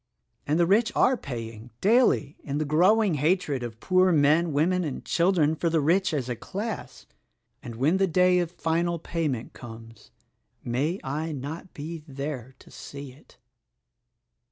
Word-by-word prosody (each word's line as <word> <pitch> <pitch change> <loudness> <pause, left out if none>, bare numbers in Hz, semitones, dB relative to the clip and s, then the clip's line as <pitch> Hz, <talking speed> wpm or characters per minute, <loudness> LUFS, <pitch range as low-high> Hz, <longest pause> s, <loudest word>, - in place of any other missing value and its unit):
And 150 +3 +1
the 170 - +5
rich 215 +6 +3
are 260 - +4
paying, 115 - -7
daily, 205 - +3
in 140 0 -3
the 155 - 0
growing 185 +7 +4
hatred 150 -2 +1
of 115 -2 -6
poor 185 +5 +3
men, 155 +2 +3
women 175 +6 +2
and 150 -5 -5
children 170 -3 +2
for 170 +2 0
the 165 0 +2
rich 175 +6 +2
as 140 -6 -2
a 125 - -2
class; 205 - -6 0.6
and 120 -2 -8
when 145 +10 +2
the 195 0 +2
day 180 +1 +4
of 175 -2 -1
final 170 0 -1
payment 150 -7 -3
comes 115 - -12 0.3
— - - -46
may 145 +10 -1
I 155 +4 -3
not 150 +7 -7
be 155 +2 -6
there 135 -2 -6
to - - -18
see 140 -1 -9
it!" 135 +4 -21
155 Hz, 160 wpm, -26 LUFS, 135-180 Hz, 0.6 s, the